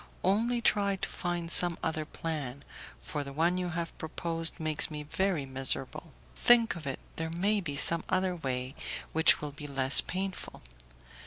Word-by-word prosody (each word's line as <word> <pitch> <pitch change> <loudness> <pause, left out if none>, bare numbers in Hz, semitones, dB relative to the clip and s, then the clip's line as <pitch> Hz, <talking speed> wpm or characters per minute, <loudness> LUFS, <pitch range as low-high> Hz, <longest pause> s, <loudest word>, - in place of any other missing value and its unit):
Only 230 +6 +1
try 200 -3 +2
to 190 - -4
find 175 -1 -4
some 175 -1 +5
other 155 -1 -2
plan, 145 -5 -5 0.4
for 145 -2 -4
the 140 - -8
one 170 +5 +1
you 180 -1 -3
have 170 -1 -5
proposed 165 +1 -1
makes 155 -2 +4
me 150 -1 -6
very 175 -1 -1
miserable. 135 +4 -3 0.2
Think 235 -3 +4
of 160 -4 -8
it, 135 - -4 0.2
there 160 0 -3
may 205 +3 +1
be 145 -6 -5
some 165 +3 +1
other 185 -1 0
way 130 -4 -3 0.4
which 160 0 +4
will 150 -1 -5
be 145 +1 -9
less 135 -1 +7
painful. 190 +1 -5
165 Hz, 165 wpm, -29 LUFS, 145-185 Hz, 0.4 s, less